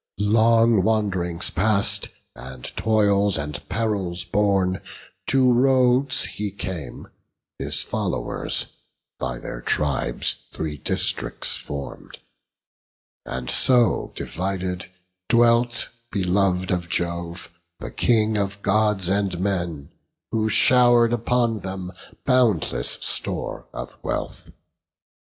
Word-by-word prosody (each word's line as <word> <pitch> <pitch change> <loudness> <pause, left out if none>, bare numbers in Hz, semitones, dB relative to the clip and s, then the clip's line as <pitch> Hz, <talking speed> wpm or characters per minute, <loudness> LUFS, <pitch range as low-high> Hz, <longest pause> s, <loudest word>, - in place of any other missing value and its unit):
Long 115 +1 +4
wand'rings 95 -5 0
past, 100 +1 +1 0.3
and 65 0 -10
toils 100 -3 +2
and 75 0 -4
perils 95 -6 -1
borne, 95 -1 +1 0.5
To 130 -1 +4
Rhodes 130 +1 +3
he 105 0 -4
came; 95 -8 -6 0.5
his - - 0
followers, - - -1 0.5
by 60 -1 -3
their - - -7
tribes, 70 -4 0
Three 75 -2 -4
districts - - +1
form'd; 70 -1 -7 1.1
and 60 0 -3
so 125 -3 +3
divided, 90 -1 -4 0.4
dwelt, 120 +1 +3 0.2
Belov'd 95 -1 +1
of 90 -2 -2
Jove, 85 +1 -3 0.3
the - - -7
King 110 -2 +2
of 100 0 -3
Gods 105 -2 +2
and 95 -2 0
men, 85 -7 -2 0.4
Who 110 -1 0
show'r'd 120 +1 +5
upon 120 -1 +1
them 95 -1 -6 0.3
boundless 115 - +2
store - - -2
of - - -8
wealth. - - -4
100 Hz, 100 wpm, -23 LUFS, 90-115 Hz, 1.1 s, show'r'd